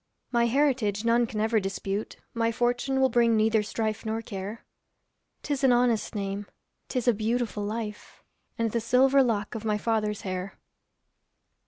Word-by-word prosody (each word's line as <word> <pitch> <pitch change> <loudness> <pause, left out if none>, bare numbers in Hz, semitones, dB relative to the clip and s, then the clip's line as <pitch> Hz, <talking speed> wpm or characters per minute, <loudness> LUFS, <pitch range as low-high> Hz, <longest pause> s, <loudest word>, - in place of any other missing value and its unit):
My 235 -1 +3
heritage 240 -6 +1
none 235 0 +3
can 215 - -4
ever 220 +1 +2
dispute, 195 +1 -4 0.2
My 230 0 +1
fortune 245 +3 0
will 265 0 +4
bring 235 -1 +3
neither 220 0 +3
strife 215 0 -3
nor 225 0 -3
care; 200 +1 -6 0.8
'Tis 285 -2 -2
an 265 - +6
honest 240 -3 +2
name, 200 0 -3 0.4
'tis 250 -2 -2
a 240 - +6
beautiful 220 0 -1
life, 210 0 -6 0.3
And 230 -1 0
the 235 - 0
silver 260 +4 +4
lock 215 -5 0
of 220 -2 -5
my 210 -1 +1
father's 210 -1 -1
hair. 185 0 -5
225 Hz, 155 wpm, -27 LUFS, 210-240 Hz, 0.8 s, an